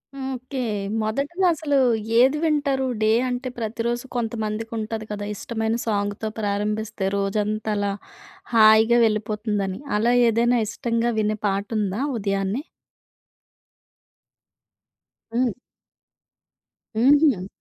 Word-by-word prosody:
Okay. 265 0 -5 0.4
మొదటిలో 280 +12 -1
అసలు 290 -2 0 0.4
ఏది 270 +4 +5
వింటారు? 285 -4 +1 0.2
డే 215 - +3 0.2
అంటే, 250 +1 -3
ప్రతిరోజు 235 +2 -2
కొంతమందికి 225 -1 -3
ఉంటది 220 0 -4
కదా! 205 0 -4
ఇష్టమైన 225 +1 -2
సాంగ్‌తో 205 +1 -1
ప్రారంభిస్తే 210 0 -2
రోజంతా 210 +2 -1
అలా 200 0 0 0.6
హాయిగా 220 +1 +6
వెళ్ళిపోతుందని. 210 -2 -1 0.2
అలా 235 +3 +2 0.2
ఏదైనా 235 +2 +2
ఇష్టంగా 230 +1 -1
వినే 215 0 0
పాట 200 +1 -1
ఉందా 205 +4 -1 0.2
ఉదయాన్నే? 195 +5 -1 2.7
హ్మ్. 245 -1 +2 1.4
హుహు. 260 - +4
220 Hz, 90 wpm, -23 LUFS, 210-245 Hz, 2.7 s, హాయిగా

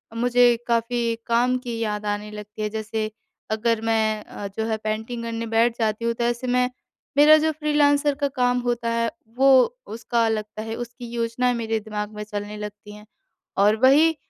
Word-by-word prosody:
मुझे 245 0 +4
काफ़ी 235 0 0
काम 245 +2 +2
की 240 -2 -5
याद 210 -2 -2
आने 210 +1 -3
लगती 210 +1 -9
है। 210 - -1
जैसे 220 0 -3 0.4
अगर 225 +1 +1
मैं 220 -1 +1
अ, 200 - -7
जो 220 +3 -4
है 220 -1 -1
पेंटिंग 220 +2 -4
करने 230 0 -3
बैठ 230 +1 +2
जाती 220 +1 0
हूँ 235 - +1
तो 235 +1 -3
ऐसे 240 +1 -1
मैं 250 0 +2 0.5
मेरा 300 +1 +8
जो 315 +1 +1
फ़्रीलांसर 295 -1 +2
का 285 0 0
काम 250 -2 +1
होता 240 -1 -1
है 230 0 0 0.3
वो 270 +1 +5 0.5
उसका 235 0 0
लगता 215 0 -3
है 225 0 -5
उसकी 240 +1 -7
योजनाएँ 240 +1 0
मेरे 225 -1 -1
दिमाग 210 0 -5
में 210 - -5
चलने 210 0 -6
लगती 210 0 -8
हैं। 210 0 -13 0.5
और 205 +2 +5
वही 305 +5 +6
230 Hz, 180 wpm, -23 LUFS, 215-245 Hz, 0.5 s, मेरा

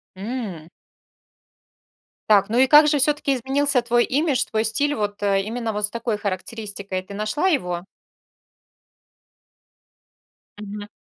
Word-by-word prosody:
М. 195 -6 -6 1.6
Так, 200 -1 +5
ну 230 - 0
и 260 - +6
как 300 +2 +7
же 295 0 +3
всё-таки 290 0 +2
изменился 270 +2 +1
твой 240 0 +2
имидж, 285 +1 +1
твой 220 0 -1
стиль? 285 +7 +1
Вот, 205 -3 -3
э, 200 -1 +2
именно 225 +1 -3
вот 210 0 0
с - - -5
такой 230 -2 -2
характеристикой, 200 -1 -5
ты 200 - -11
нашла 215 - -1
его? 180 - -1 2.8
Мгм. 205 0 -7
220 Hz, 125 wpm, -22 LUFS, 200-265 Hz, 2.8 s, как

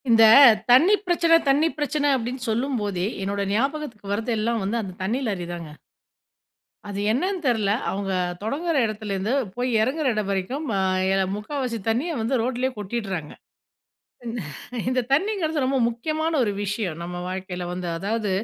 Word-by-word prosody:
இந்த 225 -1 +6 0.5
"தண்ணீ 315 +11 +7
பிரச்சனை 335 -1 +4
தண்ணீ 290 +4 +4
பிரச்சனை," 295 0 0
அப்பிடின்னு 250 0 -3
சொல்லும்போதே, 220 -6 -1 0.2
என்னோட 200 +1 -2
ஞாபகத்துக்கு 240 -4 -2
வர்றது 225 +3 -1
எல்லாம் 230 +1 0
வந்து 215 +5 -1
அந்த 190 -4 -7
தண்ணீ 225 +7 0
லாரி 190 -5 -2
தாங்க. 170 -3 -7 1.2
அது 200 -1 -4
என்னன்னு 365 - 0
தெர்ல. 220 -5 +2 0.2
அவுங்க 195 0 -2 0.3
தொடங்குற 310 +9 -1
இடத்துலேருந்து 215 0 -2 0.2
போய் 245 +1 -1
இறங்குற 280 +7 0
இடம் 215 -2 -2
வரைக்கும் 200 +11 -2
ஆ - - +1 0.3
எ - - +3 0.2
3/4 245 +2 -3
தண்ணீய 270 +10 0
வந்து 230 +4 0
ரோட் 245 +1 -2
லயே 260 - +2
கொட்டிடுறாங்க. 195 -6 -4 0.9
இந் 230 -1 -4 0.5
இந்த 255 0 +2
தண்ணீங்கிறது 320 -3 +1
ரொம்ப 265 +1 +1
முக்கியமான 310 +7 -2
ஒரு 205 - -1
விஷயம் 200 -5 -3
நம்ம 175 +1 -6
வாழ்க்கையில 185 -1 -5
வந்து 180 0 -4
அதாவது, 210 +2 -2
230 Hz, 145 wpm, -24 LUFS, 200-275 Hz, 1.2 s, தண்ணீ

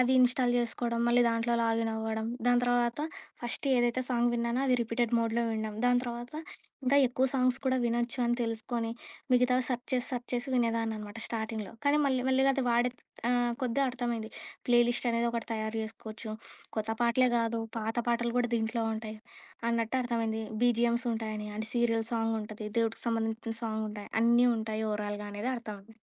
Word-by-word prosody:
అవి 255 +1 +4
ఇ‌న్‌స్టా‌ల్ 250 0 +4
చేసుకోడం 235 0 0
మళ్ళీ 240 +1 +5
దాంట్లో 230 +1 +1
లాగినవ్వడం. 225 -1 0 0.2
దాని 245 0 +5
తర్వాత 245 0 +2 0.4
ఫస్ట్ 240 +3 -3
ఏదైతే 240 +1 +2
సాంగ్ 240 -1 +2
విన్నానో 235 +1 0
అవి 255 - +4
రిపీటెడ్ 235 0 0
మోడ్‌లో 230 +1 +1
విన్నాం 220 -1 -3
దాని 245 0 +5
తర్వాత 240 0 -5 0.5
ఇంకా 265 +2 +4
ఎక్కువ 255 +2 +1
సాంగ్స్ 255 -1 +2
కూడా 260 -1 +2
వినొచ్చని 240 +1 +1
తెలుసుకొని 230 0 -2 0.4
మిగతావి 250 +1 +3
సెర్చ్ 250 -1 -2
చేసి 250 -1 +1
సెర్చ్ 245 0 -4
చేసి 245 +2 -1
వినేదాన్ననమాట. 225 -3 -1
స్టార్టింగ్‌లో 220 -2 -4
కానీ 290 +1 +5
మళ్ళీ 260 -2 +1
మెల్లిగా 265 +1 +4
అది 270 -1 0
వాడే 240 +1 +3 0.4
ఆహ్, 245 -1 +2
కొద్దిగా 255 +3 +1
అర్థమైంది. 235 -3 -3 0.4
ప్లే 240 0 +6
లిస్టనేది 235 -1 +1
ఒకటి 235 -1 -3
తయారు 220 0 -2
చేసుకోవచ్చు. 220 0 -7 0.5
కొత్త 220 0 -1
పాటలే 245 +2 +4
గాదు 230 0 0 0.2
పాత 225 +1 -3
పాటలు 235 0 +1
కూడా 245 -1 +1
దీంట్లో 225 +1 -1
ఉంటాయి. 220 0 -6 0.5
అన్నట్టర్థమైంది 230 -1 0 0.2
బిజీఎమ్స్ 240 +1 +2
ఉంటాయని, 215 -1 -4
అంటే 220 +1 -2
సీరియల్ 230 -2 +2
సాంగుంటది 220 -1 -2
దేవుడికి 225 -1 0
సంబంధించిన 225 0 -1
సాంగుంటాయి 215 -2 -4
అన్నీ 235 +2 +5
ఉంటాయి 220 0 -2
ఓవరాల్‌గా 210 0 -3
అనేది 210 +5 -2
అర్థమయింది. 220 -1 -9
235 Hz, 150 wpm, -30 LUFS, 220-245 Hz, 0.5 s, ప్లే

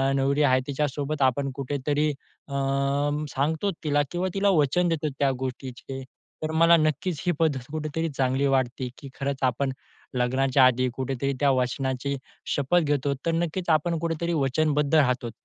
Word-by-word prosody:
नवरी 140 +2 +2
आहे 130 -2 +4
तिच्यासोबत 145 +1 -2
आपण 135 +1 +2
कुठे 140 +1 -3
तरी 150 +1 +2 0.4
अ, 140 - -8 0.8
सांगतो 160 +8 0
तिला 145 -1 +2
किंवा 180 +1 -1
तिला 200 +1 +2
वचन 175 +6 +2
देतो 155 -2 0
त्या 140 -1 +3
गोष्टीचे. 130 0 -6 0.4
तर 155 - -1
मला 165 +1 +6
नक्कीच 155 +1 0
ही 175 - +3
पद्धत 145 -6 +1
कुठे 155 -1 -3
तरी 165 0 0
चांगली 130 +1 +1
वाटते, 130 -1 0
की 140 -3 -10
खरंच 140 0 -1
आपण 130 +2 +1 0.5
लग्नाच्या 130 +2 +3
आधी 130 0 +3
कुठे 130 +1 -3
तरी 140 0 +1
त्या 145 - +3
वचनाची 130 +1 -1 0.4
शपथ 145 +5 +2
घेतो. 145 -2 0
तर 165 - +2
नक्कीच 170 +2 -2
आपण 165 +2 +2
कुठे 165 0 -1
तरी 170 0 0
वचनबद्ध 150 +1 +1
राहतोत. 125 -5 +2
140 Hz, 165 wpm, -26 LUFS, 130-155 Hz, 0.8 s, मला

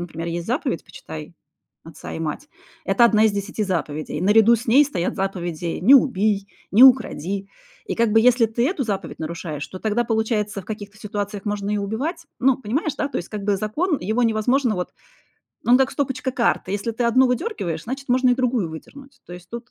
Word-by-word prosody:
например, 165 -1 -6
есть 170 0 -4
заповедь 255 - -2
"Почитай 160 -3 -10 0.5
отца 165 - -10
и - - -5
мать"- 165 - -4 0.4
это 240 - +4
1 220 -2 +4
из 220 - +3
10 200 +2 -3
заповедей. 155 -5 -3
Наряду 215 +5 +5
с 230 - -8
ней 270 +6 +6
стоят 180 -11 -3
заповеди 175 -3 -3
"Не 250 +9 +7
убий", 210 -7 +2 0.2
"Не 220 - +6
укради". 200 - +3 0.4
И - - -2
как 230 -2 +2
бы 225 - +6
если 240 0 +4
ты 235 +3 0
эту 315 -2 -1
заповедь 205 -5 -4
нарушаешь, 160 -2 -5
то 185 - -9
тогда, 220 +4 0
получается, 220 -3 -1
в - - -21
каких-то 210 0 -7
ситуациях 205 -1 -5
можно 205 -1 -2
и 210 - 0
убивать. 270 - -3
Ну 265 -1 +4
понимаешь, 265 +6 -2
да? 285 - -1
То - - -3
есть, 175 - -7
как 210 -2 -6
бы, 205 -1 +2
закон- 290 - -1
его 220 +6 0
невозможно 230 +2 +2
вот 180 0 -4 0.7
он 245 - +6
как 265 0 +2
стопочка 265 -2 -2
карт: 235 -6 0
если 205 +4 -2
ты 235 +2 -2
одну 255 +3 +4
выдергиваешь, 240 - -2
значит, 270 +3 -6
можно 255 0 +3
и 245 - +4
другую 245 -8 0
выдернуть. 275 - -12
То - - -11
есть 175 0 -13
тут 235 +1 -8
215 Hz, 200 wpm, -22 LUFS, 190-250 Hz, 0.7 s, Не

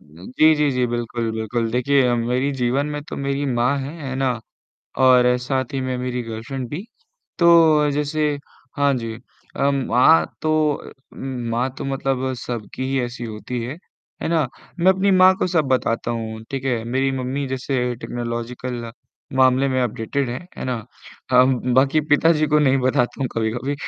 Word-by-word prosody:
जी, 95 - +1
जी, 150 -1 +2
जी, 125 -2 +1
बिल्कुल, 120 -1 -2
बिल्कुल। 110 +1 -2
देखिए, 130 +4 +2
अ, 120 - +2
मेरे 125 +4 0
जीवन 130 +4 +1
में 150 0 -4
तो - - -6
मेरी 140 +1 -2
माँ 125 +2 +1
हैं, 140 +4 -5
है 135 -2 -4
ना? 130 -3 0 0.6
और 125 -1 +5
साथ 130 0 -2
ही 135 - -1
में 130 -1 -2
मेरी 125 0 -3
गर्लफ्रेंड 120 +3 -6
भी। 160 - -5 0.5
तो 160 -4 +5
जैसे 150 +1 0 0.5
हाँ 140 -1 +3
जी, 115 -2 -4 0.4
अ, 140 +1 +2
माँ 135 +3 +4 0.2
तो 135 -5 -2
मतलब 135 -1 -1
सबकी 120 +2 -5
ही 135 - +1
ऐसी 120 0 -6
होती 115 +2 -5
हैं, 135 +7 -6 0.4
है - - -1
ना? 160 -4 +2 0.3
मैं 185 +2 +6
अपनी 190 +1 +1
माँ 185 0 +6
को - - +1
सब 170 -4 +1
बताता 120 -2 0
हूँ, 110 -1 -4
ठीक 135 -1 -4
है? 120 -4 0
मेरी 130 +3 0
मम्मी 130 +2 -2
जैसे 130 -1 -1
टेक्नोलॉजिकल 120 0 -5 0.5
मामले 130 +1 +4
में 130 -1 0
अपडेटेड 125 +3 -2
हैं, 125 - -4 0.2
है - - -5
ना? 120 -4 -3 0.5
हाँ 125 0 +6
म 125 -1 0
बाकी 135 +4 +4
पिताजी 155 +1 +4
को 150 +1 +3
नहीं 135 -3 +3
बताता 125 0 0
हूँ 135 - +1
कभी-कभी। 120 +5 -2
130 Hz, 165 wpm, -21 LUFS, 120-140 Hz, 0.6 s, मैं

